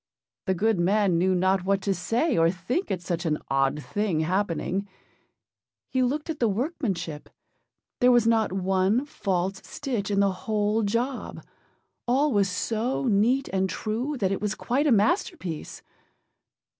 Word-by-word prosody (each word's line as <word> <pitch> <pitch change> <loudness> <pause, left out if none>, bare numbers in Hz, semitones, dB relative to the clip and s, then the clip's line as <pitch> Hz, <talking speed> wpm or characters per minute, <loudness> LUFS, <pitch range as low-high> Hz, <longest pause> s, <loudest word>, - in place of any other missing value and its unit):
The 190 - +2
good 215 +1 +1
man 190 -1 +2
knew 185 +1 +2
not 185 +1 +2
what 195 +1 +1
to 200 - +1
say 235 - 0
or 165 0 +4
think 190 - -2
at 180 -2 -2
such 170 0 -2
an 155 -3 0
odd 135 +2 +1
thing 205 -7 -1
happening. 190 +2 -1 1.0
He 260 - +1
looked 280 +4 0
at 320 -2 -4
the 235 - +3
workmanship; 195 - -3 0.7
there 250 0 +5
was 240 -2 +4
not 225 -3 +2
one 190 +6 +1
false 190 -7 -2
stitch 240 -8 -4
in 200 -1 +1
the 200 -1 +3
whole 210 +3 0
job; 235 +5 -2 0.6
all 275 +5 +3
was 200 -2 +3
so 225 +8 -1
neat 240 +5 +2
and 190 0 0
true, 235 - -3
that 195 -5 0
it 195 - -2
was 210 0 -1
quite 275 +5 0
a - - +4
masterpiece. 215 - 0
200 Hz, 155 wpm, -26 LUFS, 185-240 Hz, 1.0 s, there